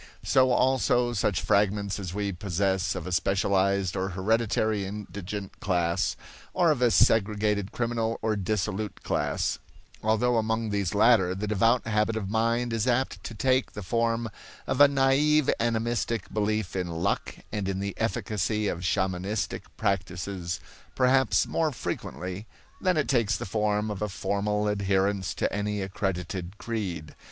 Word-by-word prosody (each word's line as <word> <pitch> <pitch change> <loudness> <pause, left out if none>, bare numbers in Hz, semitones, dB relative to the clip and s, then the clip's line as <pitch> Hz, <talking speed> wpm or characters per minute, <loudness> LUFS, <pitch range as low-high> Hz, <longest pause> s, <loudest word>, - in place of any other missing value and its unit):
So 130 -1 +4
also 125 -1 +2
such 100 -4 0
fragments 100 -1 +1
as 95 -3 -5
we 100 +1 -2
possess 95 -1 -1
of 90 -3 -5
a 90 - -5
specialized 95 0 +1
or 95 0 -1
hereditary 110 +2 +1
indigent 100 0 -6
class, 85 -3 0 0.4
or 170 -3 +4
of 145 - -1
a 120 - +5
segregated 105 -2 +2
criminal 115 -1 -1
or 110 -1 +1
dissolute 105 +1 -2
class; - - -1 0.4
although 110 +3 +2
among 110 0 0
these 100 -2 -1
latter 100 -4 +4
the 100 +3 -3
devout 115 +4 +2
habit 110 0 +1
of 100 -3 -3
mind 115 +2 +1
is 115 +1 0
apt 130 +2 0
to 115 - -6
take 130 +3 +1
the 105 - -6
form 115 +4 0 0.4
of 130 +1 0
a 145 - +10
naive 140 +2 +3
animistic 115 -1 -1
belief 105 -2 -1
in 90 -2 -1
luck 85 0 -2 0.2
and 100 -2 -2
in 95 -1 -2
the 100 0 -3
efficacy 105 -1 -1
of 85 - -2
shamanistic 95 +3 -1
practices 90 -1 -2 0.4
perhaps 130 +1 +3
more 160 -2 0
frequently 95 -4 -5 0.3
than 185 -3 +2
it 150 - +1
takes 115 -5 +2
the - - -5
form 105 +1 0
of 105 - -5
a 105 - -1
formal 105 +2 -1
adherence 100 -1 0
to - - -1
any 105 0 -1
accredited 95 -1 -3
creed. 95 -10 -4
105 Hz, 145 wpm, -27 LUFS, 95-115 Hz, 0.4 s, a